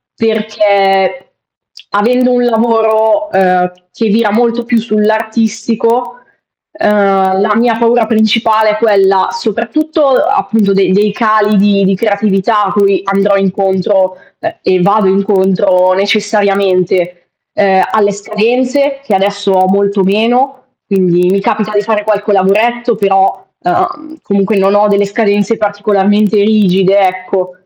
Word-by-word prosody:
perché 210 -1 0 0.6
avendo 250 +5 +1
un 245 0 +1
lavoro, 225 +4 +1
uhm, 180 -1 +1 0.2
che 225 +5 -3
vira 215 0 +1
molto 235 +1 0
più 235 -1 0
sull'artistico, 225 +2 -1 0.6
uhm, 195 -4 +1
la 210 +1 +1
mia 230 +1 +1
paura 235 0 +1
principale 220 0 +1
è - - -2
quella 195 -4 +2
soprattutto, 305 - -2
appunto, 230 - 0
dei 190 -1 +1
dei 205 +2 +1
cali 215 -1 +1
di 200 0 +2
di 195 0 +1
creatività 205 0 0
cui 200 -2 +1
andrò 195 +1 0
incontro 190 0 0 0.2
uhm, 335 0 -5
e 185 -1 0
vado 200 +1 +2
incontro 190 -1 +1
necessariamente, 195 -3 -1 0.3
uhm, 190 -2 +2
alle 205 -2 +1
scadenze, 250 +7 -1
che 260 - -3
adesso 200 +1 -1
ho 185 -1 +2
molto 200 +1 0
meno. 235 +7 +1 0.3
Quindi 180 -2 +1
mi 195 +1 0
capita 215 +1 -2
di 205 - +1
fare 210 0 -2
qualche 210 0 -1
lavoretto 225 +5 +1
però, 195 -2 0 0.2
ehm, 355 -4 -3
comunque 200 +1 -1
non 195 +1 +2
ho 210 +1 +3
delle 200 0 +1
scadenze 205 +1 -1
particolarmente 205 0 0
rigide, 200 -2 +2
ecco. 185 -1 -2
205 Hz, 125 wpm, -11 LUFS, 195-225 Hz, 0.6 s, ho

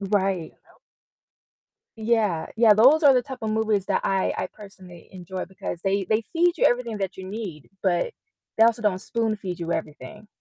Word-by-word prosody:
Right. 195 -4 -1 1.4
Yeah. 215 -7 0
Yeah, 220 -2 +6
those 270 +9 +6
are 280 -2 +7
the 250 - +3
type 260 0 -8
of 220 - -1
movies 215 -3 0
that - - 0
I 190 -1 +1
I - - -2
personally 190 -4 -14
enjoy 185 0 -6
because 185 -2 -6
they 195 0 0
they 220 +1 +2
feed 345 +1 +2
you - - +2
everything 235 -3 +1
that 195 -1 -3
you 190 - -8
need, 190 -8 -7
but 190 - +1 0.4
they 225 - +6
also 230 0 +2
don't 195 -3 +1
spoon 225 0 -1
feed 185 -3 -6
you 170 0 -3
everything. 160 +7 -6
205 Hz, 180 wpm, -24 LUFS, 185-225 Hz, 1.4 s, are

